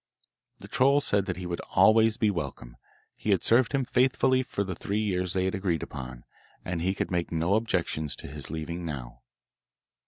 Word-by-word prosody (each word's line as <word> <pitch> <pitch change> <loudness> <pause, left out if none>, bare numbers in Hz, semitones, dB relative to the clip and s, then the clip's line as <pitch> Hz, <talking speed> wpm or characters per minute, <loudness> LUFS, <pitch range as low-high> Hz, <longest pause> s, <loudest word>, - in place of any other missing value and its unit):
The - - -12
troll 140 +1 +4
said 100 -8 +1
that - - -2
he 90 - -6
would 85 -1 -3 0.2
always 110 0 +5
be 105 -2 +2
welcome; 70 -8 -5 0.4
he - - -5
had - - +3
served 120 +1 +4
him 135 -2 0
faithfully 130 +1 +3
for 115 -5 -2
the 95 -1 -4
three 100 +4 -3
years 90 -4 0
they 95 -1 +1
had 95 - 0
agreed 95 -5 -1
upon, 65 -3 -7 0.4
and 90 -2 -2
he 95 +3 0
could - - -3
make 85 -1 -1
no 85 +3 +1
objections 85 -9 0
to - - -9
his 75 -1 -8
leaving 80 +2 -4
now. 60 -6 -6
90 Hz, 190 wpm, -28 LUFS, 80-110 Hz, 0.4 s, always